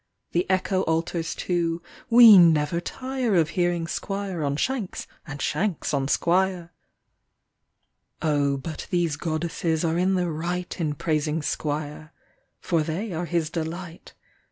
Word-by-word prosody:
The 175 +1 0
echo 190 0 +1
alters 165 +1 -1
to 170 -2 -1 0.2
" - - -22
We 230 -3 +11
never 165 -2 +4
tire 255 +1 -2
Of 160 -3 +3
hearing 175 -1 0
Squire 195 -1 -4
on 140 -1 0
Shanks 230 - -2 0.2
and 145 -1 -7
Shanks 190 -4 -1
on 135 -1 0
Squire." 175 +1 +1 1.5
Oh, 145 -3 +1
but 155 +3 -7
these 175 -5 0
Goddesses 160 +1 -2
are 165 +1 0
in 190 +1 +2
the 180 -2 0
right 175 +3 -4
In 150 -2 -1
praising 155 +1 -1
Squire. 150 +1 -4 0.5
For 165 -3 0
they 175 +7 -3
are 170 +2 -2
his 165 -2 -1
delight. 170 +1 -6
170 Hz, 135 wpm, -25 LUFS, 155-180 Hz, 1.5 s, We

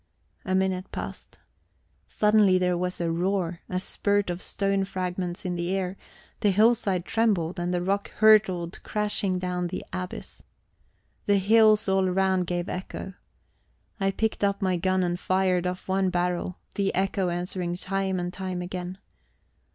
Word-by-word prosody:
A 185 - 0
minute 190 0 0
passed. - - -7 0.7
Suddenly 210 -3 +4
there 180 -1 +1
was 180 +1 -2
a 170 -1 0
roar 175 0 -1
a 185 - -1
spurt 200 0 0
of 175 +1 -5
stone 195 -1 0
fragments 180 -1 -4
in 180 - -1
the 175 +2 -1
air 190 -1 -2 0.4
the 205 - +3
hillside 205 -3 +3
trembled, 195 -7 +1
and 175 +1 -1
the 175 -1 0
rock 200 +2 -1
hurtled 195 -5 +4
crashing 210 -3 0
down 180 -1 -2
the - - -5
abyss. 185 -1 -6 0.9
The 205 -1 +4
hills 215 +2 +5
all 190 -1 +2
round 190 -1 +1
gave 175 0 -2
echo. 190 +1 -5 0.9
I 195 0 +2
picked 220 +2 -1
up 200 0 +2
my 185 -2 +1
gun 185 +1 +1
and 175 0 -1
fired 185 -1 +1
off 180 0 -5
one 190 0 +1
barrel; 180 0 -1 0.2
the 195 -1 0
echo 190 -1 +1
answered 175 0 -2
time 190 -1 -1
and 175 0 -3
time 185 -2 -4
again. 180 +1 -5
185 Hz, 150 wpm, -26 LUFS, 180-195 Hz, 0.9 s, hills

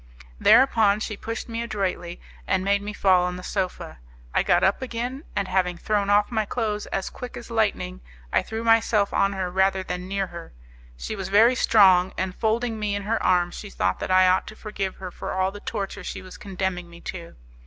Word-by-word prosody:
Thereupon 220 -6 +5
she 215 - -4
pushed 225 +2 -5
me 230 0 -4
adroitly, 190 -6 -3 0.3
and 190 0 +1
made 200 0 +2
me 205 +1 -5
fall 190 -3 +3
on 180 0 -1
the 180 - -8
sofa. 185 - -4 0.3
I - - +3
got - - +3
up 195 +6 +2
again, 255 +3 -4
and, 200 -2 0
having 185 -1 0
thrown 205 0 0
off 205 +2 +3
my 220 -2 +1
clothes 210 -1 -2
as 195 - -3
quick 250 - -8
as 235 0 -10
lightning 200 - -1 0.3
I - - +4
threw 225 +1 -5
myself 225 -3 +3
on 195 0 +2
her 185 -2 -3
rather 190 +1 +2
than 180 0 -5
near 195 0 -1
her. 170 -2 -10 0.4
She 215 - -5
was 195 -2 -5
very 220 +5 +6
strong; 190 -6 +5
and 185 0 -2
folding 225 +2 -1
me 210 -1 -1
in 200 - -3
her 220 +3 -1
arms 175 -1 +2
she 205 - -8
thought 95 - -1
that - - -4
I 185 0 +5
ought 185 0 +2
to 215 - -9
forgive 205 -3 -4
her 185 -1 -7
for - - -6
all 190 0 +1
the 205 - -9
torture 200 -1 -5
she 185 - -6
was 185 - -11
condemning 190 -3 -4
me 170 0 -13
to. 170 -2 -8
200 Hz, 210 wpm, -24 LUFS, 185-215 Hz, 0.4 s, very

